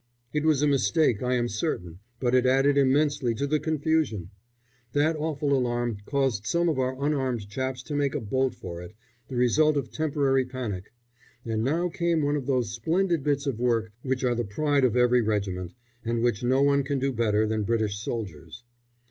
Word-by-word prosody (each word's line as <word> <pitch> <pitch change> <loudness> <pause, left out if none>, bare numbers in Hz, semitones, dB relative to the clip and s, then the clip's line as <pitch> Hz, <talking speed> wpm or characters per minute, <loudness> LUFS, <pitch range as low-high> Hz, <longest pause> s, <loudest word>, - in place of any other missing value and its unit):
It 150 0 0
was 150 -3 +3
a - - +4
mistake, 125 -2 +2
I 125 0 +1
am 120 -1 +1
certain, 95 - -3 0.2
but 125 -1 0
it 130 0 +4
added 135 +2 +4
immensely 140 -2 +2
to 140 - -1
the 150 +2 +1
confusion. 150 - -1 0.6
That 150 +3 +2
awful 150 -2 -1
alarm 120 -3 0
caused 135 -7 0
some 170 +5 +2
of 150 - -1
our 130 +2 -1
unarmed 130 -8 -1
chaps 130 +3 -3
to 150 - -7
make 145 -2 0
a - - 0
bolt 130 +4 -1
for 85 0 -7
it, 90 +4 -11 0.3
the 130 - -7
result 145 +5 +3
of 135 - -3
temporary 140 -4 +1
panic; 120 -7 -5 0.5
and 110 -1 -1
now 165 +8 +1
came 170 -2 0
one 145 +1 +1
of 140 -3 -3
those 125 -6 0
splendid 165 - 0
bits 145 0 0
of 130 -5 -2
work 115 -3 +1
which 130 0 -2
are 125 -1 +2
the 120 0 -1
pride 140 +6 +1
of 125 -1 +1
every 125 0 +4
regiment, 100 -4 -2 0.3
and 115 0 -1
which 120 -5 +1
no 130 +3 +3
one 140 0 +3
can 140 +1 -1
do 135 0 0
better 110 -2 +2
than 110 0 -1
British 105 -1 0
soldiers. 90 -6 -6
130 Hz, 190 wpm, -26 LUFS, 115-145 Hz, 0.6 s, a